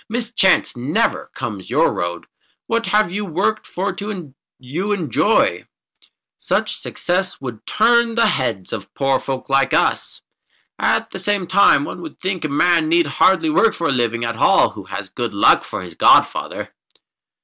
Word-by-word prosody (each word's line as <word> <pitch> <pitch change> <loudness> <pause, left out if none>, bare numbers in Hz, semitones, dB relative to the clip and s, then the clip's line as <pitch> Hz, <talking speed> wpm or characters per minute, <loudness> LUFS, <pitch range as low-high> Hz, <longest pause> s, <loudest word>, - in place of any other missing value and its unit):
Mischance 225 - +1
never 125 +5 -1
comes 105 -5 -6
your - - +2
road. 85 0 -4 0.4
What 230 0 -1
you - - -3 0.3
have 180 - -9
worked 215 +4 0
for 190 +3 -3 0.7
you 170 +11 -3
enjoy. 165 - +1 0.7
Such - - -1
success 185 +1 -2
would 120 -5 -8
turn 235 +1 +2
the 235 - +3
heads 115 -9 -1
of 100 -3 -6
poor 135 -1 +1
folk 130 -1 -5
like 135 0 +2
us. - - 0 0.6
At - - 0
the - - -6
same 205 -3 -1
time 200 - +4
one 300 - -7
would 325 - -10
think 185 -2 -3
a 155 - -2
man 165 +2 +2
need 170 0 +3
hardly 190 - +2
work 225 -7 +3
for 165 - -1
his 135 - +1
living 120 -1 0
at 115 -1 -4
all - - +4
who 100 -3 -11
has 95 +1 -6
Good 115 +2 -4
Luck 100 - +4
for - - -6
his - - -10
godfather." - - +2
160 Hz, 160 wpm, -19 LUFS, 120-200 Hz, 0.7 s, time